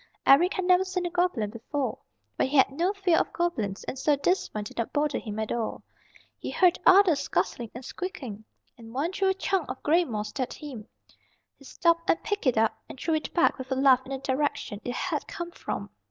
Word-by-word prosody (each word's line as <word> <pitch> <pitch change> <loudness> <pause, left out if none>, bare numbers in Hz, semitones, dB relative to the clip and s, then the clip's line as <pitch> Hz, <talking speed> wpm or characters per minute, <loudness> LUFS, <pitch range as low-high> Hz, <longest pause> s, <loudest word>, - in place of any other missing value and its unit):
Eric 335 +7 +6
had 375 - -1
never 365 +1 +5
seen 365 -1 -3
a 350 - -2
goblin 350 - 0
before, 245 +2 -3 0.4
but - - +1
he 285 +2 0
had 265 - +5
no 340 +7 +1
fear 385 -5 +2
of - - -1
goblins, 225 - -2
and 265 - -5
so 295 +2 +3
this 355 +7 0
one 210 - -4
did 210 - -10
not 230 - -1
bother 295 0 0
him 210 -2 -6
at 220 -1 -2
all. 235 -2 -3 0.6
He - - -5
heard 365 -2 +3
others 370 -6 +7
scuttling 240 -4 -1
and 245 +1 -8
squeaking, 255 - -6 0.4
and 225 +1 -12
one 305 +6 0
threw 385 0 +1
a - - +3
chunk 385 -3 -1
of 260 - -6
gray 335 +4 +4
moss 215 -8 -4
at 255 - -1
him. 250 -8 -9 0.7
He 275 - -16
stopped 335 +3 +1
and 330 - +2
picked 410 -8 -2
it 250 - +3
up 220 0 +2
and 265 - -10
threw 330 - 0
it 310 -2 -1
back 345 -5 +3
with 260 0 -7
a - - +2
laugh 260 -1 +5
in 260 - -13
the 270 - -1
direction 265 -6 -2
it 245 - -4
had - - -2
come 345 0 -6
from. - - -5
285 Hz, 225 wpm, -27 LUFS, 245-350 Hz, 0.7 s, others